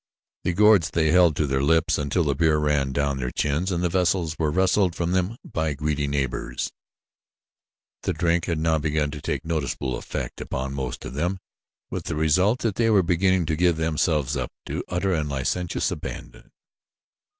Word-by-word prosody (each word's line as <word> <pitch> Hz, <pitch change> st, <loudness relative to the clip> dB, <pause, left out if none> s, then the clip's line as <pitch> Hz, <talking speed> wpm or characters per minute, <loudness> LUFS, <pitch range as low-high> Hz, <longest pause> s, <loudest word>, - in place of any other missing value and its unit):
The 90 Hz, -, 0 dB
gourds 105 Hz, -3 st, +5 dB
they 80 Hz, -2 st, +1 dB
held 85 Hz, -3 st, +5 dB
to 75 Hz, -, +1 dB
their 65 Hz, -1 st, 0 dB
lips 80 Hz, +3 st, +2 dB
until 75 Hz, +5 st, 0 dB
the 70 Hz, -2 st, +1 dB
beer 80 Hz, +1 st, +2 dB
ran 75 Hz, -3 st, +1 dB
down 70 Hz, 0 st, 0 dB
their 65 Hz, -2 st, -2 dB
chins 75 Hz, +9 st, -1 dB
and 90 Hz, -1 st, -1 dB
the -, -, +3 dB
vessels 85 Hz, -2 st, +1 dB
were 80 Hz, -2 st, +1 dB
wrested 95 Hz, +2 st, +2 dB
from 85 Hz, 0 st, -1 dB
them 95 Hz, +5 st, 0 dB
by 80 Hz, -2 st, -2 dB
greedy 75 Hz, 0 st, -1 dB
neighbors. 70 Hz, -3 st, -2 dB, 1.3 s
The -, -, -1 dB
drink 85 Hz, +1 st, +1 dB
had 85 Hz, -3 st, -1 dB
now 80 Hz, 0 st, +1 dB
begun 75 Hz, -1 st, 0 dB
to 75 Hz, -1 st, -7 dB
take -, -, -3 dB
noticeable 70 Hz, -5 st, -2 dB
effect -, -, -5 dB
upon 65 Hz, +1 st, -4 dB
most 65 Hz, -3 st, -4 dB
of -, -, -6 dB
them, 85 Hz, +7 st, -1 dB, 0.5 s
with -, -, -4 dB
the -, -, -3 dB
result 90 Hz, +10 st, +2 dB
that 110 Hz, -4 st, -1 dB
they 115 Hz, -1 st, +3 dB
were 100 Hz, -4 st, +4 dB
beginning 90 Hz, +1 st, +2 dB
to 80 Hz, 0 st, 0 dB
give 85 Hz, 0 st, +2 dB
themselves 75 Hz, -3 st, 0 dB
up 65 Hz, -1 st, -3 dB
to -, -, -4 dB
utter 90 Hz, +2 st, 0 dB
and 75 Hz, -3 st, -1 dB
licentious 70 Hz, +6 st, -1 dB
abandon. -, -, -7 dB
80 Hz, 185 wpm, -24 LUFS, 75-90 Hz, 1.3 s, gourds